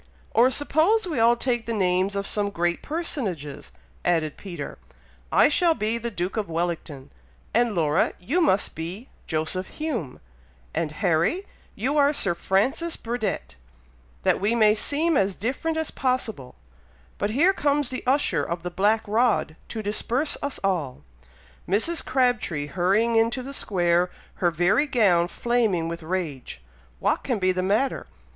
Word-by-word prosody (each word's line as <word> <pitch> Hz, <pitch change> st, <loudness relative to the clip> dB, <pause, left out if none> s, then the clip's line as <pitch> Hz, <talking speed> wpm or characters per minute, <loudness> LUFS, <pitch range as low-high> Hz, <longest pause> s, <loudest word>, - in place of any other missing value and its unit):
"Or 245 Hz, +3 st, +5 dB
suppose 320 Hz, +10 st, +2 dB
we 315 Hz, -9 st, -2 dB
all 230 Hz, +1 st, +5 dB
take 240 Hz, -1 st, -1 dB
the 230 Hz, -, -1 dB
names 185 Hz, 0 st, +1 dB
of 200 Hz, 0 st, -2 dB
some 205 Hz, 0 st, 0 dB
great 175 Hz, -2 st, -1 dB
personages," 220 Hz, -, -4 dB, 0.3 s
added 160 Hz, -4 st, +1 dB
Peter, 175 Hz, -7 st, -7 dB, 0.5 s
"I -, -, +6 dB
shall 330 Hz, +2 st, +3 dB
be 220 Hz, 0 st, -1 dB
the 235 Hz, +1 st, -3 dB
Duke 185 Hz, -1 st, -3 dB
of 205 Hz, -5 st, -2 dB
Wellington, 165 Hz, -5 st, -3 dB, 0.4 s
and 235 Hz, -2 st, +2 dB
Laura, 155 Hz, 0 st, +2 dB
you 275 Hz, -, 0 dB
must 205 Hz, -, +2 dB
be 180 Hz, -, -6 dB, 0.2 s
Joseph 160 Hz, +4 st, -1 dB
Hume, 240 Hz, -, -4 dB, 0.5 s
and 160 Hz, -1 st, -1 dB
Harry, 170 Hz, -, +1 dB, 0.3 s
you 280 Hz, +6 st, 0 dB
are 285 Hz, +1 st, +4 dB
Sir 195 Hz, -9 st, +2 dB
Francis 230 Hz, -, 0 dB
Burdett, 215 Hz, -, -3 dB, 0.7 s
that -, -, +2 dB
we 215 Hz, +4 st, +2 dB
may 215 Hz, -2 st, +5 dB
seem 295 Hz, +9 st, +1 dB
as 195 Hz, -4 st, +2 dB
different 275 Hz, +9 st, -2 dB
as 320 Hz, -1 st, -2 dB
possible; 230 Hz, -, -2 dB, 0.6 s
but 205 Hz, -, 0 dB
here 315 Hz, -, +4 dB
comes 290 Hz, -5 st, +1 dB
the 255 Hz, -, -4 dB
usher 280 Hz, +3 st, +2 dB
of 170 Hz, 0 st, -4 dB
the 180 Hz, -, -4 dB
black 210 Hz, +5 st, +2 dB
rod 215 Hz, -6 st, +1 dB
to 220 Hz, -2 st, -5 dB
disperse 235 Hz, +8 st, 0 dB
us 285 Hz, -1 st, -4 dB
all! 170 Hz, -10 st, -1 dB, 0.7 s
Mrs. 230 Hz, -, +2 dB
Crabtree 245 Hz, -, +1 dB
hurrying 195 Hz, +9 st, +1 dB
into 230 Hz, +3 st, +1 dB
the 275 Hz, +2 st, -7 dB
square, 175 Hz, -6 st, +1 dB, 0.3 s
her 175 Hz, -, +4 dB
very 175 Hz, -, +2 dB
gown 195 Hz, -10 st, +3 dB
flaming 220 Hz, -6 st, 0 dB
with 170 Hz, 0 st, -5 dB
rage! 160 Hz, -, -4 dB, 0.4 s
what -, -, +1 dB
can 250 Hz, -4 st, 0 dB
be 185 Hz, -1 st, +2 dB
the 185 Hz, 0 st, -1 dB
matter! 210 Hz, +8 st, 0 dB
210 Hz, 150 wpm, -25 LUFS, 175-255 Hz, 0.7 s, I